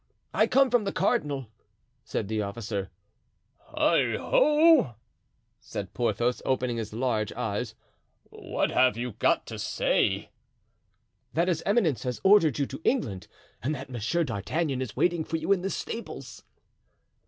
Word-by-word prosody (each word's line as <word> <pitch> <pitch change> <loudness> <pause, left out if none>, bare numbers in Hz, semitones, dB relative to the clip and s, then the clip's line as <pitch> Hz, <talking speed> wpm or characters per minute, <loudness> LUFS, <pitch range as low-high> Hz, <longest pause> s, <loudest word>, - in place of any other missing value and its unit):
"I - - +3
come 270 -1 +4
from 245 -3 +3
the 195 - -2
cardinal," 145 - 0 0.6
said 110 -1 -3
the 110 0 -1
officer. 100 -1 -4 0.9
"Heigho!" 310 - +4 0.6
said - - -7
Porthos, 120 +1 0
opening 125 -2 0
his 110 -2 -4
large 110 -2 -1
eyes; - - -3 0.6
"what - - -2
have 130 -2 +3
you 120 +1 -3
got - - +1
to - - -7
say?" - - 0 1.0
"That 170 +3 +2
his 170 -3 0
eminence 195 - +2
has 125 -2 -3
ordered 190 - +5
you 140 - +1
to 135 +3 -8
England 100 - 0 0.3
and 145 +6 -1
that 135 -1 -8
Monsieur 125 +9 0
d'Artagnan 135 - -2
is 125 -5 -5
waiting 175 -2 +1
for 165 - -2
you 160 +4 -2
in 195 -2 +3
the 195 - -2
stables." 230 +3 -6
135 Hz, 140 wpm, -27 LUFS, 115-180 Hz, 1.0 s, ordered